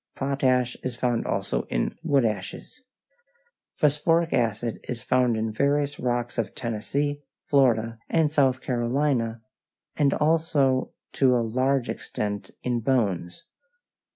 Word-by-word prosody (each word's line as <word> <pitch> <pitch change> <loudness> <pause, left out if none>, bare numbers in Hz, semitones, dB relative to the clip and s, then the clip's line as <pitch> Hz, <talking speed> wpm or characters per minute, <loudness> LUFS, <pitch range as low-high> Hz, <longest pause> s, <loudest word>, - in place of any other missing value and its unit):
Potash 130 -2 +1
is 130 -1 -4
found 120 -2 0
also 95 -11 -1
in - - 0
unleached - - -3
wood 140 -6 +3
ashes. 110 - -4 0.9
Phosphoric 165 +3 +2
acid 115 -1 0
is 115 -2 -4
found 125 -3 +2
in 110 0 -2
various 145 +4 +1
rocks 120 -1 -1
of 105 -4 -2
Tennessee, 140 +6 -2 0.2
Florida, 115 -5 +2
and 160 -3 +2
South 135 -4 +2
Carolina, 120 -2 0 0.5
and 145 -2 +3
also 150 -4 +2 0.2
to 130 -2 +3
a 120 -1 +1
large 130 +3 +1
extent 105 -1 -4
in 120 -1 0
bones. 110 - -1
125 Hz, 125 wpm, -25 LUFS, 115-140 Hz, 0.9 s, wood